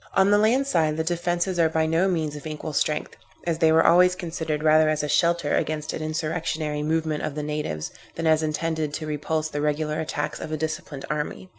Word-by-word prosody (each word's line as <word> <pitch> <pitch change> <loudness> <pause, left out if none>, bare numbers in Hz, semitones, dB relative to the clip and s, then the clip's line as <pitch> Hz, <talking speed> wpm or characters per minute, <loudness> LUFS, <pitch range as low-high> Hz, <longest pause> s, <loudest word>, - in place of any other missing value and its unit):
On 195 +1 +4
the 205 - +5
land 240 +6 +3
side, 160 - +1
the 160 - 0
defences 175 +2 -1
are 165 -1 +4
by 160 0 +1
no 165 +4 +2
means 160 -5 -1
of 150 +1 -7
equal 155 0 -5
strength, 150 +1 -1 0.3
as 165 -2 -1
they 160 -2 +5
were 160 +1 +5
always 180 +2 +6
considered 160 -4 -3
rather 155 0 +5
as 155 -1 0
a - - -1
shelter 170 -1 +2
against 155 -1 -2
an - - -4
insurrectionary 155 -1 -2
movement 155 0 0
of 150 - -3
the 150 - -3
natives, 150 - -3 0.2
than 165 - -3
as 160 -1 +4
intended 155 -1 -1
to 155 - -4
repulse 155 +1 -2
the 145 -1 -3
regular 150 +1 -1
attacks 150 -2 -3
of 155 - -6
a 155 - -1
disciplined 155 -2 -4
army. 150 +5 -4
155 Hz, 210 wpm, -25 LUFS, 150-165 Hz, 0.3 s, always